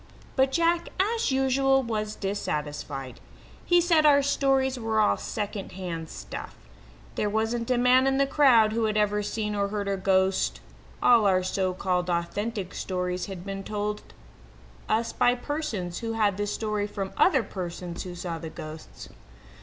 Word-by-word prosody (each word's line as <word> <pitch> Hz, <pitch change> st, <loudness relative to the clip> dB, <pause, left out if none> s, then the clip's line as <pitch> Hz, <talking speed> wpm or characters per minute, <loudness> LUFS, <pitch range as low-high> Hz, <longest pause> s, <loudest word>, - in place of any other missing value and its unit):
But 265 Hz, 0 st, +3 dB
Jack, 335 Hz, +2 st, +1 dB
as 445 Hz, -2 st, +1 dB
usual, 270 Hz, 0 st, +3 dB
was 215 Hz, -2 st, -3 dB
dissatisfied. 150 Hz, -8 st, -4 dB, 0.4 s
He 350 Hz, 0 st, +4 dB
said 335 Hz, -2 st, +4 dB
our 285 Hz, -2 st, +6 dB
stories 270 Hz, -2 st, +1 dB
were 225 Hz, -1 st, 0 dB
all 210 Hz, -, +4 dB
second 205 Hz, -2 st, -5 dB
hand 170 Hz, -4 st, -5 dB
stuff. -, -, -8 dB, 0.6 s
There 210 Hz, -, -1 dB
wasn't 225 Hz, +3 st, -1 dB
a 250 Hz, -, +3 dB
man 250 Hz, +2 st, +5 dB
in 270 Hz, 0 st, +2 dB
the 275 Hz, -, +4 dB
crowd 255 Hz, -6 st, +5 dB
who 225 Hz, 0 st, +1 dB
had 215 Hz, -1 st, 0 dB
ever 210 Hz, 0 st, +2 dB
seen 210 Hz, 0 st, -3 dB
or 200 Hz, -1 st, 0 dB
heard 200 Hz, 0 st, -3 dB
a 200 Hz, 0 st, 0 dB
ghost; 190 Hz, 0 st, +1 dB, 0.4 s
all 230 Hz, -4 st, +6 dB
our 185 Hz, -1 st, +3 dB
so 185 Hz, 0 st, -1 dB
called 180 Hz, -1 st, -1 dB
authentic 195 Hz, +3 st, -2 dB
stories 180 Hz, 0 st, -3 dB
had 190 Hz, -2 st, -7 dB
been 195 Hz, 0 st, -5 dB
told 210 Hz, +1 st, -3 dB, 0.9 s
us 230 Hz, +1 st, +1 dB
by 245 Hz, 0 st, +3 dB
persons 245 Hz, -, -4 dB
who 225 Hz, -1 st, -3 dB
had 210 Hz, -3 st, +2 dB
the 205 Hz, +1 st, -2 dB
story 210 Hz, -1 st, -2 dB
from 195 Hz, -2 st, -5 dB
other 275 Hz, -10 st, +4 dB
persons 175 Hz, -3 st, -6 dB
who 180 Hz, -1 st, -7 dB
saw 175 Hz, -2 st, -5 dB
the 160 Hz, 0 st, -6 dB
ghosts. 155 Hz, 0 st, -9 dB
210 Hz, 160 wpm, -27 LUFS, 185-250 Hz, 0.9 s, our